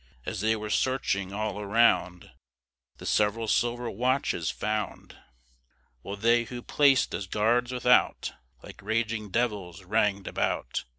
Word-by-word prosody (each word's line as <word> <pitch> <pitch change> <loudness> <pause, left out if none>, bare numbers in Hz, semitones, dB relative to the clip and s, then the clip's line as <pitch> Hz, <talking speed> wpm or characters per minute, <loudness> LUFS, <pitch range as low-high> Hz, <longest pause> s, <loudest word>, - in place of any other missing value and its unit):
As 105 - -4
they 110 +1 +2
were 105 -1 -5
searching 100 -8 0
all 105 0 -3
around, 100 -4 +2 0.7
They - - -11
several 110 +2 +1
silver 120 +2 0
watches 125 - 0
found; 105 0 -4 0.9
While 100 - -6
they 115 +3 +2
who're 120 +1 -8
plac'd 140 -3 +3
as 100 - -4
guards 120 +5 +1
without, 125 0 +2 0.3
Like - - -12
raging 110 0 -2
devils 100 -5 -2
rang'd 100 0 +1
about. 60 - -2
110 Hz, 125 wpm, -27 LUFS, 100-120 Hz, 0.9 s, plac'd